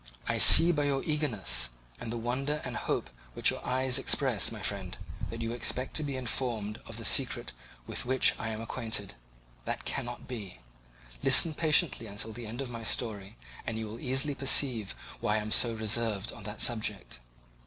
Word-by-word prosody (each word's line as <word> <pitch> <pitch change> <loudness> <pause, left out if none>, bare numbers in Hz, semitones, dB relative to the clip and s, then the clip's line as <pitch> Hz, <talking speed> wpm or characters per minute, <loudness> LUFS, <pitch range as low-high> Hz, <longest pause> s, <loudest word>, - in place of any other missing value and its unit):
I - - -2
see 170 +1 +10
by 150 -3 -1
your 140 -1 -2
eagerness 110 - -1 0.3
and 115 - -7
the 120 - -4
wonder 135 +6 -3
and - - -6
hope - - -4 0.2
which - - +3
your - - -8
eyes 130 +1 +1
express, 130 -6 +1
my 110 -3 -9
friend, 95 -3 -5 0.3
that 115 0 -6
you 115 - -4
expect 120 +2 -2
to 155 - -2
be 140 -2 -5
informed 115 -4 -4
of - - -8
the - - -7
secret - - 0 0.3
with - - -3
which 130 +1 +2
I 115 - -4
am 110 0 -6
acquainted; 115 - -4 0.5
that - - -4
cannot 120 0 -6
be; 100 - -8 0.6
listen 165 - +6
patiently 155 -6 +3
until 105 +2 -6
the 115 0 -9
end 120 +5 -6
of 130 - -9
my 115 -1 -7
story, 105 -2 -4 0.3
and 115 - -4
you 110 - -5
will 110 +2 -9
easily 135 +3 0
perceive 130 -6 +1 0.2
why 110 -2 -1
I 110 - -1
am 105 +1 -7 0.3
reserved 110 -1 -1
upon 105 - -12
that 105 0 +1
subject. 110 - +2
115 Hz, 180 wpm, -28 LUFS, 110-130 Hz, 0.6 s, see